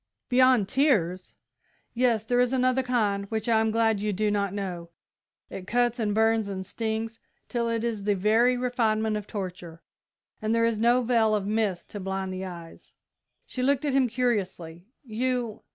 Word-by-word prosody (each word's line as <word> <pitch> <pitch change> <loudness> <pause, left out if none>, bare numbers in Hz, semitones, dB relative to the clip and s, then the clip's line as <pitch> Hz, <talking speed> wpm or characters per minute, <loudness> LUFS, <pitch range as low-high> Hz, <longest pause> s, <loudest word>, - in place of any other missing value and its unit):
"Beyond 255 -4 +4
tears?" 200 - +1 0.6
"Yes; 235 -3 +2
there 245 +2 +1
is 250 +1 +2
another 255 0 +2
kind, 215 -6 0
which 220 +2 -3
I 225 -1 +4
am 220 0 +1
glad 225 -1 +2
you 210 +1 -1
do 210 +2 0
not 200 -2 0
know. 180 -4 -5 0.6
It 185 -1 -7
cuts 240 +1 +1
and 210 -2 0
burns 220 -1 +2
and 190 -1 -5
stings 225 +1 -4 0.3
till 235 -1 -1
it 230 -1 -1
is 230 -3 -2
the 205 0 +1
very 225 +6 +3
refinement 225 -3 0
of 210 -1 -5
torture, 180 -4 -7 0.6
and 215 +1 0
there 230 0 +3
is 230 -2 0
no 240 +2 +3
veil 225 -3 +2
of 205 -2 -2
mist 210 -4 -1
to 205 - -6
blind 190 0 -3
the 185 0 -5
eyes." 170 -3 -11 0.5
She 255 - -5
looked 280 +2 +1
at 285 - 0
him 265 -2 +3
curiously. 195 -8 -2 0.2
"You 245 -1 -2
220 Hz, 175 wpm, -26 LUFS, 200-245 Hz, 0.6 s, Beyond